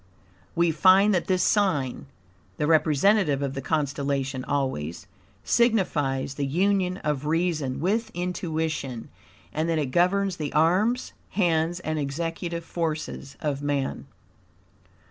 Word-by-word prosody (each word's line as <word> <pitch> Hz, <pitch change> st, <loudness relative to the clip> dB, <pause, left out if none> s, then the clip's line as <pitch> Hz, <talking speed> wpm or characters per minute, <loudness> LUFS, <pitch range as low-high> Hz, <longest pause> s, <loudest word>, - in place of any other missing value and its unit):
We 170 Hz, 0 st, +3 dB
find 190 Hz, +6 st, +5 dB
that 180 Hz, -, 0 dB
this 185 Hz, -2 st, +2 dB
sign 155 Hz, -, +1 dB, 0.5 s
(the 150 Hz, -, 0 dB
representative 155 Hz, 0 st, +3 dB
of 135 Hz, -1 st, -2 dB
the 135 Hz, -, -4 dB
constellation 140 Hz, -3 st, -1 dB
always) 130 Hz, -, -2 dB, 0.4 s
signifies 155 Hz, -, +1 dB
the 140 Hz, 0 st, -2 dB
union 185 Hz, +4 st, +1 dB
of 150 Hz, -1 st, -1 dB
reason 155 Hz, -5 st, 0 dB
with 210 Hz, +8 st, 0 dB
intuition, 160 Hz, -8 st, -3 dB, 0.4 s
and 160 Hz, +2 st, -1 dB
that 165 Hz, -, +1 dB
it 145 Hz, -4 st, -1 dB
governs 185 Hz, +3 st, +2 dB
the 150 Hz, -2 st, -3 dB
arms, 190 Hz, +11 st, +2 dB, 0.2 s
hands 175 Hz, -2 st, +1 dB
and 155 Hz, -2 st, -2 dB
executive 165 Hz, +4 st, -3 dB
forces 155 Hz, -5 st, -4 dB
of 145 Hz, -2 st, -2 dB
man. 145 Hz, -2 st, -2 dB
160 Hz, 120 wpm, -25 LUFS, 140-180 Hz, 0.5 s, find